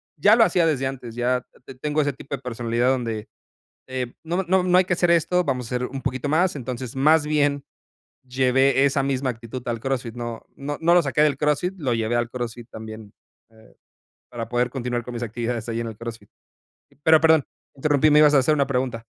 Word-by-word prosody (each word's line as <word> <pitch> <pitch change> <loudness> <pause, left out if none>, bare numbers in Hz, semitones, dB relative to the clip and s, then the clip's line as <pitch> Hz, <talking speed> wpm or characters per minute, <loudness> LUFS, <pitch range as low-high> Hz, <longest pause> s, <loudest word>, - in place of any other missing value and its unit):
ya 205 +7 +5
lo 230 - +6
hacía 175 -5 +2
desde 140 -5 +1
antes, 125 -4 -7
ya 125 +1 0 0.2
te 135 - -11
tengo 150 +4 -1
ese 145 -1 0
tipo 140 +2 -6
de 135 - -12
personalidad 120 0 -1
donde, 115 -4 -2 0.6
eh, 130 -2 -4
no 175 +4 -1
no 185 +1 +2
no 180 0 +4
hay 185 - +4
que 180 - 0
hacer 175 0 +1
esto, 170 +2 +2
vamos 130 -5 -2
a 125 - -1
hacer 125 0 -2
un 135 +1 -7
poquito 130 +1 -2
más, 170 +3 +2
entonces, 125 -1 -6
más 150 +3 +4
bien 145 -2 +1 0.6
llevé 130 +1 +3
esa 140 0 +1
misma 135 -1 -1
actitud 115 +2 -8
al 115 -1 -2
CrossFit, 125 -2 -3
no 120 -1 -6
no 145 +1 -5
no 170 +1 +3
lo 175 - +6
saqué 140 -2 0
del 145 -3 +2
CrossFit, 150 +5 0
lo 130 -6 0
llevé 115 +1 -1
al 120 0 0
CrossFit 120 -1 -6
también, 110 -1 -10 0.4
eh, 110 -1 -21 0.6
para 115 -2 -6
poder 120 +1 +1
continuar 125 -2 -3
con 125 +1 -8
mis 120 - -5
actividades 115 0 -3
ahí 115 0 -2
en 115 - -3
el 110 -2 -7
CrossFit. 115 -2 -8 0.7
Pero, 160 0 +6
perdón, 160 -2 +4 0.3
interrumpí, 145 +2 +2
me 150 - +6
ibas 150 -1 +6
a - - +6
hacer 140 +4 +3
una 140 -2 +1
pregunta. 125 -4 -2
130 Hz, 215 wpm, -23 LUFS, 120-150 Hz, 0.7 s, lo